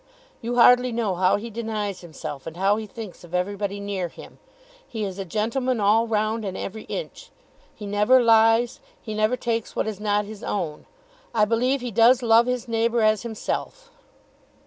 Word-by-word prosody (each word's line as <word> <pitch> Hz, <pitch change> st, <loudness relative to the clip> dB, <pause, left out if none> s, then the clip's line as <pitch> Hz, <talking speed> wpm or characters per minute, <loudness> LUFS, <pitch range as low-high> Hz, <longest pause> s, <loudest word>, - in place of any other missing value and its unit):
You 240 Hz, +1 st, -3 dB
hardly 250 Hz, +1 st, +6 dB
know 225 Hz, -4 st, -1 dB
how 185 Hz, +1 st, +3 dB
he 225 Hz, +3 st, -5 dB
denies 215 Hz, -4 st, -4 dB
himself, 155 Hz, -4 st, -8 dB
and 165 Hz, +1 st, -7 dB
how 195 Hz, +3 st, +2 dB
he 220 Hz, -1 st, -5 dB
thinks 215 Hz, -5 st, -9 dB
of 175 Hz, +1 st, -7 dB
everybody 200 Hz, +2 st, -2 dB
near 200 Hz, -3 st, -3 dB
him. -, -, -14 dB, 0.5 s
He 220 Hz, -2 st, -4 dB
is 195 Hz, -1 st, -5 dB
a 195 Hz, -, -3 dB
gentleman 230 Hz, +6 st, -1 dB
all 215 Hz, +3 st, +3 dB
round 220 Hz, 0 st, 0 dB
and 190 Hz, -2 st, -4 dB
every 215 Hz, +2 st, -6 dB
inch. -, -, -7 dB, 0.5 s
He 210 Hz, -, -8 dB
never 210 Hz, +5 st, +4 dB
lies. 230 Hz, 0 st, +4 dB, 0.2 s
He 215 Hz, -, -7 dB
never 215 Hz, +3 st, +1 dB
takes 230 Hz, -3 st, -3 dB
what -, -, 0 dB
is 215 Hz, -3 st, -4 dB
not 210 Hz, 0 st, 0 dB
his 210 Hz, 0 st, -10 dB
own. 165 Hz, -7 st, -4 dB, 0.5 s
I 215 Hz, -2 st, +4 dB
believe 250 Hz, +5 st, +1 dB
he 245 Hz, -1 st, -4 dB
does 235 Hz, +4 st, +5 dB
love 230 Hz, +1 st, +5 dB
his 250 Hz, -2 st, -2 dB
neighbour 230 Hz, 0 st, +1 dB
as 215 Hz, -1 st, +3 dB
himself." 480 Hz, -, -5 dB
220 Hz, 180 wpm, -24 LUFS, 200-235 Hz, 0.5 s, hardly